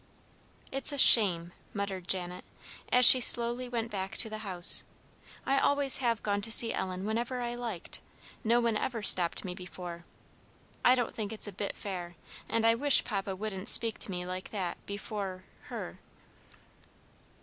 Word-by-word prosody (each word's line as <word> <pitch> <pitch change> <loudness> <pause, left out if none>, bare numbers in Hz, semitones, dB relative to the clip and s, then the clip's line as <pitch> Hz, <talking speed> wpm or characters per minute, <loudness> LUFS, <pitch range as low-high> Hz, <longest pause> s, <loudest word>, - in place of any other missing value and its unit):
"It's 270 +2 +2
a 285 - -5
shame!" 175 -10 +5 0.2
muttered 195 -3 -5
Janet, 180 -1 +1 0.5
as 250 0 +5
she 255 - +9
slowly 240 +1 +1
went 230 -2 -4
back 195 -1 -5
to 220 - +2
the 215 - -6
house. 185 -5 +3 0.6
"I 275 0 +1
always 285 -1 +2
have 235 -4 -2
gone 205 -1 -2
to 225 +2 -1
see 230 0 +7
Ellen 185 0 -5
whenever 235 +4 -3
I 240 0 -4
liked. 235 -7 -7 0.4
No 235 +1 +2
one 230 -2 -1
ever 230 -1 -5
stopped 180 -1 +4
me 180 - -5
before. 180 -2 -10 0.8
I 250 - +5
don't 245 -3 -3
think 210 -2 -6
it's 220 - -4
a - - -7
bit 200 +1 -6
fair; 175 -3 -8 0.3
and 230 0 -1
I 230 - +4
wish 280 +4 +4
Papa 195 -3 -5
wouldn't 195 -1 -3
speak 230 -2 +2
to - - -3
me 180 -1 -5
like 185 +1 -7
that 190 -5 -6
before 200 -2 -6 0.2
her." - - -9
210 Hz, 165 wpm, -29 LUFS, 185-235 Hz, 0.8 s, she